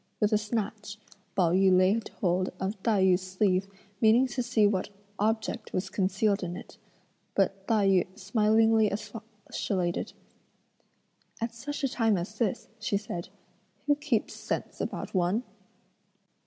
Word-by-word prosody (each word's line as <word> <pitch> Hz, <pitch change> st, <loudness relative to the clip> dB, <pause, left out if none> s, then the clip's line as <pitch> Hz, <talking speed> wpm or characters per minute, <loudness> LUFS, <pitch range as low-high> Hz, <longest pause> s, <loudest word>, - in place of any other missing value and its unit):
With 210 Hz, 0 st, +2 dB
a -, -, +6 dB
snatch, 210 Hz, -1 st, -3 dB, 0.4 s
Pao 180 Hz, -4 st, +3 dB
yü 190 Hz, +1 st, +4 dB
laid 195 Hz, +5 st, +2 dB
hold 185 Hz, 0 st, +1 dB
of 190 Hz, +1 st, -3 dB
Tai 210 Hz, -4 st, +2 dB
yü's 185 Hz, -1 st, +4 dB
sleeve 185 Hz, 0 st, +1 dB, 0.3 s
meaning 225 Hz, +3 st, +6 dB
to 250 Hz, -, -2 dB
see 235 Hz, -3 st, +2 dB
what 205 Hz, -1 st, +1 dB, 0.3 s
object 220 Hz, +1 st, -1 dB
was 185 Hz, 0 st, -2 dB
concealed 195 Hz, +1 st, +1 dB
in 180 Hz, -1 st, -4 dB
it; -, -, -12 dB, 0.6 s
but 195 Hz, 0 st, 0 dB
Tai 215 Hz, -3 st, +3 dB
yü 185 Hz, -1 st, +2 dB
smilingly 220 Hz, +2 st, +3 dB
expostulated: 205 Hz, -4 st, -3 dB, 1.3 s
"At 230 Hz, 0 st, -2 dB
such 290 Hz, +6 st, -6 dB
a -, -, +4 dB
time 225 Hz, -5 st, +2 dB
as 200 Hz, +5 st, -6 dB
this," 220 Hz, -5 st, -1 dB
she 210 Hz, -2 st, 0 dB
said, 185 Hz, -4 st, -6 dB, 0.6 s
"who 290 Hz, -, +4 dB
keeps 290 Hz, -6 st, -1 dB
scents -, -, -4 dB
about -, -, -4 dB
one?" 185 Hz, +5 st, +1 dB
205 Hz, 140 wpm, -29 LUFS, 190-225 Hz, 1.3 s, a